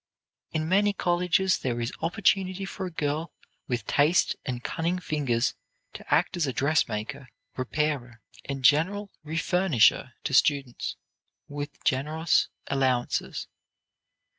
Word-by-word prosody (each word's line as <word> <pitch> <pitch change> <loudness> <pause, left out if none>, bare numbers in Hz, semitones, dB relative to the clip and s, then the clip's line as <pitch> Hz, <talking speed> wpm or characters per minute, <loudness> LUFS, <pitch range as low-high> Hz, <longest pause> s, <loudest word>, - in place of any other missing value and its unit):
In 155 -1 -1
many 200 +3 +3
colleges 180 +1 +2
there 120 -2 -2
is 115 0 -2
opportunity 190 +2 +1
for 190 -1 -5
a - - -8
girl 155 +1 -2 0.3
with 120 -5 -2
taste 150 - +3
and 125 -1 -4
cunning 170 +2 -1
fingers 140 -9 0 0.4
to - - -10
act - - +3
as 170 -5 0
a 130 - -2
dressmaker, 135 -3 -1 0.3
repairer, 130 -3 -2 0.2
and 135 -2 -4
general 190 +8 +3
refurnisher 160 - +2
to - - -3
students 135 -3 +2 0.5
with 145 0 -7
generous 155 +5 +2 0.2
allowances. 130 -3 0
150 Hz, 115 wpm, -27 LUFS, 130-175 Hz, 0.5 s, many